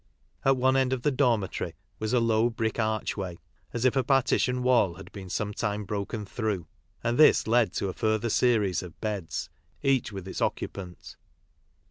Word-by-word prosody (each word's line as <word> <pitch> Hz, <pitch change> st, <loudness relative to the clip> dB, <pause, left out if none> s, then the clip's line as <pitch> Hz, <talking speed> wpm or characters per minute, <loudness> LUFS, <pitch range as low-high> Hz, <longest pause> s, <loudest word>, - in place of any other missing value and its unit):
At 135 Hz, 0 st, +4 dB
one 130 Hz, +1 st, +3 dB
end 130 Hz, -1 st, +2 dB
of 125 Hz, -2 st, -3 dB
the 150 Hz, -, +3 dB
dormitory 120 Hz, -8 st, 0 dB, 0.2 s
was 110 Hz, 0 st, -2 dB
a 125 Hz, -, +4 dB
low 115 Hz, 0 st, +3 dB
brick 115 Hz, -1 st, -2 dB
archway, 110 Hz, -4 st, -1 dB, 0.4 s
a -, -, -13 dB
s 120 Hz, +1 st, 0 dB
if 130 Hz, -, +4 dB
a 130 Hz, -, +3 dB
partition 125 Hz, -1 st, +2 dB
wall 120 Hz, -9 st, +3 dB
had 95 Hz, -, -11 dB
been 95 Hz, -3 st, -9 dB
sometime 105 Hz, +1 st, -2 dB
broken 105 Hz, +2 st, -3 dB
through, 105 Hz, -5 st, -2 dB, 0.4 s
and 120 Hz, +3 st, 0 dB
ths 155 Hz, -, +6 dB
led 115 Hz, -3 st, +3 dB
to 100 Hz, -, -1 dB
a 95 Hz, -, -3 dB
further 110 Hz, +1 st, 0 dB
series 105 Hz, -8 st, +2 dB
of 90 Hz, -2 st, -11 dB
beds, 100 Hz, -7 st, -3 dB, 0.3 s
each 135 Hz, -5 st, +2 dB
with 95 Hz, -2 st, -7 dB
its 95 Hz, -, -5 dB
occupant. 90 Hz, -3 st, -4 dB
110 Hz, 175 wpm, -28 LUFS, 100-125 Hz, 0.4 s, ths